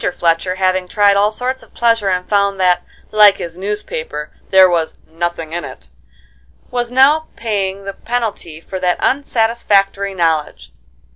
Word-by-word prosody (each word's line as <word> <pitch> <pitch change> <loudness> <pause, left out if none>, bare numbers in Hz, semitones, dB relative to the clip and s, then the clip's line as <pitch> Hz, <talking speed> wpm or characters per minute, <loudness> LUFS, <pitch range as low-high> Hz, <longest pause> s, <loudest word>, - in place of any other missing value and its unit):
Fletcher, 170 +2 0
having 185 -1 0
tried 205 +1 +3
all 205 +1 +3
sorts 250 +4 -3
of - - -20
pleasure 230 -4 +2
and 180 -1 -1
found 200 -1 +1
that, 180 -1 +3 0.3
like 210 -2 +6
his 170 -1 -7
newspaper, 175 -6 -5 0.2
there 190 -1 +7
was 170 -3 -1
"nothing 165 -1 -4
in 175 - -3
it," 60 -1 -10 0.8
was 245 -1 -2
now 285 +5 +4
paying 200 -3 -3
the 195 - -5
penalty 220 -11 -4
for 185 +3 -7
that 180 -1 +1
unsatisfactory 210 -7 +1
knowledge. 155 - -1
195 Hz, 145 wpm, -17 LUFS, 175-215 Hz, 0.8 s, there